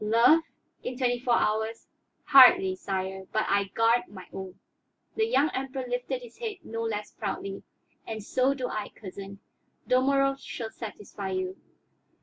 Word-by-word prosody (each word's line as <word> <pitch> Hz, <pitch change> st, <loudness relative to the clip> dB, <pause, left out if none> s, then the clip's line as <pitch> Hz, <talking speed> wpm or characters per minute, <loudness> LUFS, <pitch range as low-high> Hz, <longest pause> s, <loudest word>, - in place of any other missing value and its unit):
"Love? 235 Hz, +9 st, +5 dB, 0.4 s
In 250 Hz, -, -4 dB
twenty 245 Hz, -2 st, +1 dB
four 240 Hz, -1 st, +2 dB
hours? 220 Hz, +1 st, 0 dB, 0.4 s
Hardly, 255 Hz, -10 st, +7 dB
sire; 190 Hz, 0 st, -4 dB
but 215 Hz, -, +1 dB
I 200 Hz, 0 st, +2 dB
guard 230 Hz, +4 st, +2 dB
my 185 Hz, -3 st, -11 dB
own." 190 Hz, -1 st, -7 dB, 0.6 s
The 440 Hz, 0 st, +2 dB
young 310 Hz, -, +3 dB
Emperor 265 Hz, 0 st, -3 dB
lifted 245 Hz, +1 st, -3 dB
his 240 Hz, -1 st, -13 dB
head 450 Hz, -3 st, -3 dB
no 230 Hz, -3 st, -5 dB
less 210 Hz, -2 st, -3 dB
proudly. 195 Hz, -2 st, -4 dB, 0.5 s
"And 220 Hz, -2 st, -5 dB
so 260 Hz, +5 st, +1 dB
do 255 Hz, -2 st, -3 dB
I, 215 Hz, -3 st, -4 dB
cousin. 200 Hz, 0 st, -9 dB, 0.5 s
Dalmorov 275 Hz, +1 st, +3 dB
shall 225 Hz, -4 st, -6 dB
satisfy 205 Hz, -3 st, -7 dB
you." 185 Hz, 0 st, -2 dB
225 Hz, 145 wpm, -28 LUFS, 200-260 Hz, 0.6 s, Hardly